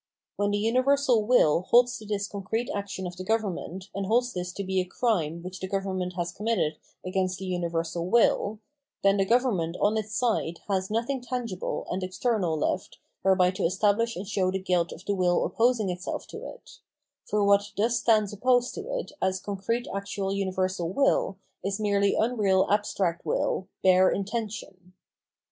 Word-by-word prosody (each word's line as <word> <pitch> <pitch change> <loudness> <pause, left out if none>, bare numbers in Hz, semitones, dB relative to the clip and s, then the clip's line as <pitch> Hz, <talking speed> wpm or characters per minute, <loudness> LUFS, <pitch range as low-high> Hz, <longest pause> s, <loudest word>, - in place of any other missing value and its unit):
When 205 0 0
the 205 - +1
universal 250 +1 +2
will 170 -10 +5
holds 245 +1 +5
to 215 - -11
this 205 -1 -1
concrete 210 +4 -3
action 200 -2 -4
of 180 0 -5
the 185 - -5
government 190 -3 -2
and 195 -1 -3
holds 245 +3 +2
this 180 0 -3
to 200 - -4
be 190 -1 0
a - - -1
crime 175 -5 -1
which 185 +1 -7
the 190 - -4
government 185 -2 -2
has 175 0 -1
committed 210 -7 -1 0.3
against 185 0 -1
the 190 - -6
universal 170 -1 -2
will, 220 -1 +3 0.5
then 195 0 +4
the 195 - +2
government 205 -9 +1
on 210 +2 +2
its 215 0 -3
side 220 -9 0
has 190 -2 0
nothing 240 +5 -1
tangible 240 -6 -3
and 185 - -2
external 185 -2 0
left 180 +4 -2 0.2
whereby 185 -1 +4
to 185 - -6
estabhsh 210 +6 +2
and 190 +3 -6
show 190 -2 +1
the 190 - 0
guilt 180 -2 0
of 180 - -10
the 205 - 0
will 180 -2 +2
opposing 230 -4 +2
itself 180 +1 -5
to - - -8
it; - - -13 0.5
for 210 0 +2
what 200 0 +3
thus 235 +3 +2
stands 215 -3 +3
opposed 245 +3 +2
to - - -5 0.2
it - - -5
as 190 0 +1
concrete 205 +5 -2
actual 195 0 -3
uni 195 -1 -1
versal 185 -2 -1
will 200 -5 +2 0.3
is 195 +2 -2
merely 200 -1 +2
unreal 210 -5 +2
abstract 195 -4 0
wiU, 190 - -1 0.2
bare 185 0 +6
intention. 200 -3 -4
200 Hz, 175 wpm, -27 LUFS, 185-220 Hz, 0.5 s, bare